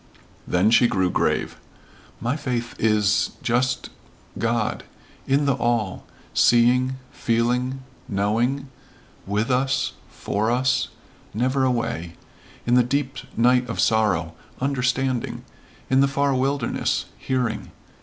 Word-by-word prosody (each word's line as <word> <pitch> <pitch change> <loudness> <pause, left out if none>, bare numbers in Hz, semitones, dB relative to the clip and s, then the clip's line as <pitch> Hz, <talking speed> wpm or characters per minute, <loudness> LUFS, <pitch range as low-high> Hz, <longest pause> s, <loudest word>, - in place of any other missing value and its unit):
Then 90 +5 +3
she 120 +1 +6
grew 95 -5 +1
grave, - - 0 0.6
"My 120 +4 -1
faith 125 -5 -3
is 105 -2 +2
just 125 +1 0 0.4
God. 115 -1 -1 0.4
In 140 +2 +2
the 140 - +3
all. 115 -6 -1 0.3
Seeing 125 +2 +4 0.2
feeling 125 +3 0 0.3
knowing 115 +8 0 0.6
with 105 +5 0
us 130 +2 +1 0.2
for 105 +2 -2
us 125 +2 +1 0.5
never 130 +4 +1
away 100 -9 -2 0.5
in 120 - +1
the 125 - +6
deep 135 +2 -1 0.2
night 125 +1 +3
of 115 - -4
sorrow 95 -7 +2 0.3
understanding. 130 -2 -1 0.4
In 130 +1 +3
the 140 - +5
far 140 0 +1
wilderness 135 -1 0
hearing. 125 -4 -2
125 Hz, 110 wpm, -23 LUFS, 110-130 Hz, 0.6 s, she